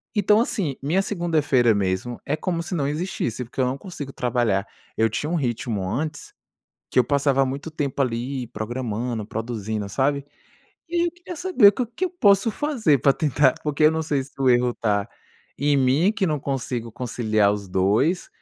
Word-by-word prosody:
Então, 210 +1 +4
assim, 185 - -1
minha 170 +7 +2
segunda-feira 155 - +2
mesmo 100 +4 -2
é 145 - 0
como 170 0 -2
se 175 +2 -4
não 145 -5 0
existisse, 150 - -2
porque 125 - -4
eu 130 - +3
não 130 +2 -1
consigo 145 -5 -8
trabalhar. 120 -5 0 0.3
Eu 110 0 +3
tinha 145 +8 -3
um 175 - 0
ritmo 120 - -2
antes 150 +5 -4 0.6
que - - +1
eu 125 - +6
passava 140 0 +2
muito 140 +5 -5
tempo 145 -3 -1
ali 125 +1 -2
programando, 120 -1 -3
produzindo, 110 -2 -4
sabe. 140 +5 0 0.6
E 345 - -3
aí 340 - +3
eu 340 - -3
queria 355 0 -9
saber 355 - +5
o 250 - 0
que 240 +11 -4
eu - - -6
posso 205 - +3
fazer 230 - +1
para 140 - +5
tentar 145 -2 +2
porque 150 0 +1
eu 155 - +7
não 160 - -1
sei 145 -3 0
se 140 - -18
o 130 - +3
erro 120 0 +3
está 105 -3 -1 0.5
em 145 +1 +2
mim, 135 +9 +3
que 205 -4 0
não 150 -3 -1
consigo 125 -4 -3
conciliar 110 -4 +1
os 100 -1 -5
dois 105 - +1
135 Hz, 185 wpm, -23 LUFS, 120-165 Hz, 0.6 s, eu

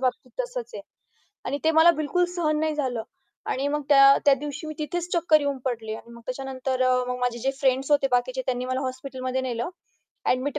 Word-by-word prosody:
बाबतीत 255 - -2
तसंच - - -4
आहे. - - -6 0.6
आणि 285 - -2
ते 320 - +5
मला 320 +2 +7
बिलकुल 320 +3 0
सहन 310 -3 +1
नाही 315 -1 0
झालं 255 -6 -2 0.5
आणि 270 +2 -1
मग 295 +1 -1
त्या 275 -1 +8
त्या 280 - +7
दिवशी 295 +1 -5
मी 310 - -5
तिथेच 345 +3 -3
चक्कर 330 -3 +4
येऊन 285 -1 -1
पडले 225 -4 -3
आणि 235 - -11
मग 235 - -12
त्याच्यानंतर 260 0 -2
अ, 255 0 +4
मग 250 0 -2
माझे 245 -1 0
जे 265 +3 0
फ्रेंड्स 265 +1 +1
होते 285 -2 +4
बाकीचे 255 +1 +1
त्यांनी 250 -1 -1
मला 255 0 -1
हॉस्पिटलमध्ये 260 0 -3
नेलं. 240 +3 -3 0.6
ॲडमिट 275 +4 0
270 Hz, 200 wpm, -25 LUFS, 255-300 Hz, 0.6 s, त्या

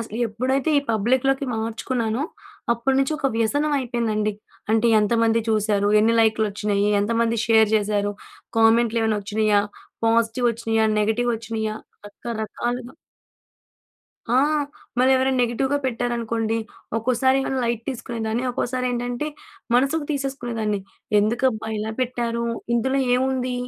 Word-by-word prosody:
అసలు 225 0 -6
ఎప్పుడైతే 260 +7 0
ఈ - - +2
పబ్లిక్‌లోకి 260 +5 +1
మార్చుకున్నానో, 230 +2 -2 0.5
అప్పటి 245 +3 0
నుంచి 275 +3 +1
ఒక 285 - 0
వ్యసనం 290 +7 +1
అయిపోయిందండి. 225 -4 -1 0.4
అంటే 225 +1 +3
ఎంతమంది 230 +1 +2
చూశారు, 210 -2 +1
ఎన్ని 230 +2 +3
లైక్‌లొచ్చిన్నియ్యి, 210 -2 +1
ఎంతమంది 230 +1 +1
షేర్ 220 -2 +5
చేశారు, 205 -1 0 0.5
కామెంట్లేవైనా 225 -1 +3
వచ్చినాయా! 210 0 +2 0.4
పాజిటీవోచ్చిన్నియా, 225 0 +1
నెగటీవోచ్చిన్నియా, 220 0 -1 0.3
రకరకాలుగా 235 +3 -4 1.4
ఆ! 240 - +1 0.6
మరెవరైనా 260 +1 +3
నెగెటివ్‌గా 265 +4 0
పెట్టారనుకోండి, 230 -2 -1 0.4
ఒక్కోసారేమో 260 +3 +1
లైట్ 235 -1 -1
తీసుకునేదాన్ని, 235 -2 -3
ఒక్కోసారేంటంటే 245 +1 -2 0.5
మనసుకు 275 +5 +2
తీసేసుకునేదాన్ని 240 -7 -2 0.4
ఎందుకబ్బా! 220 0 0
ఇలా 220 +1 -3
పెట్టారు? 235 -2 -1 0.3
ఇందులో 265 +4 +1 0.2
ఏముంది 255 -1 0
230 Hz, 95 wpm, -23 LUFS, 220-255 Hz, 1.4 s, షేర్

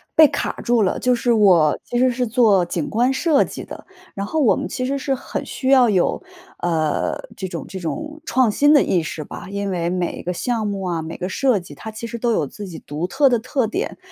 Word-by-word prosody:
被 315 -1 +8
卡 - - -2
住 235 -2 +3
了。 185 - 0
就 250 -1 +2
是 240 0 0
我 180 -9 +4
其 240 - -3
实 255 0 +4
是 245 0 -1
做 215 -6 +4
景 170 -3 -3
观 245 +4 +2
设 290 +2 +3
计 - - -8
的， - - -10 0.3
然 200 0 -4
后 315 +7 0
我 235 - +5
们 - - -3
其 255 - -3
实 275 +2 -1
是 270 0 -1
很 - - -5
需 260 - -3
要 260 -3 +6
有， 185 -4 +1 0.4
呃， 160 -3 0 0.2
这 190 - -4
种 170 -3 -6
这 190 - -6
种 305 - -5
创 255 -5 +2
新 290 +6 +4
的 290 - +6
意 175 - +1
识 155 0 -5
吧。 - - -9
因 200 0 -3
为 170 -2 -1
每 180 -1 -2
一 - - -7
个 180 - -2
项 225 +2 -1
目 200 -1 -3
啊， 175 -3 -2
每 160 +1 -6
个 180 - -4
设 255 +3 +2
计， 180 -1 -8
它 220 - -8
其 220 +1 -7
实 235 0 -5
都 235 -1 +1
有 155 - +1
自 205 +8 -8
己 170 -3 -8
独 150 +4 -4
特 275 +7 +3
的 240 -2 +2
特 255 +2 -1
点。 220 - -3
220 Hz, 265 characters per minute, -21 LUFS, 180-255 Hz, 0.4 s, 被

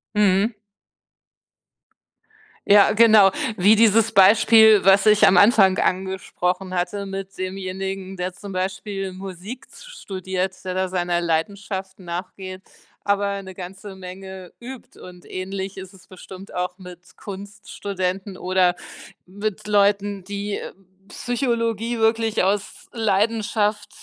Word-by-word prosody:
Mhm. 205 +2 +3 2.1
Ja, 205 0 +6
genau. 215 -3 +6 0.3
Wie 205 +4 +5
dieses 225 0 +4
Beispiel, 220 +1 +6
was 195 +2 +5
ich 215 0 +6
am 185 - +5
Anfang 195 -2 +5
angesprochen 185 0 -2
hatte 190 +3 -2
mit 195 0 -7
demjenigen, 190 0 -5
der 180 +1 -3
zum 200 +1 -10
Beispiel 195 +1 -4
Musik 190 +6 -9
z - - -14
studiert, 190 - -4
der 185 -1 -4
da 185 0 0
seiner 175 -1 -1
Leidenschaft 190 +3 -3
nachgeht, 185 +1 -7 0.4
aber 200 0 0
'ne 190 -1 -11
ganze 190 +2 -9
Menge 190 0 -10
übt 255 +1 -11
und 180 -1 -13
ähnlich 190 +1 -5
ist 190 0 -9
es 190 - -18
bestimmt 190 +1 -12
auch 180 0 -3
mit 180 -2 -14
Kunststudenten 195 -1 -5
oder 185 0 +1 0.5
mit 205 +2 -5
Leuten, 205 -1 +1
die, 200 +1 -4
äh, - - -8 0.4
Psychologie 235 -1 -2
wirklich 225 -1 +1
aus 195 +1 -2
Leidenschaft, 215 -1 0
195 Hz, 115 wpm, -22 LUFS, 185-205 Hz, 2.1 s, Ja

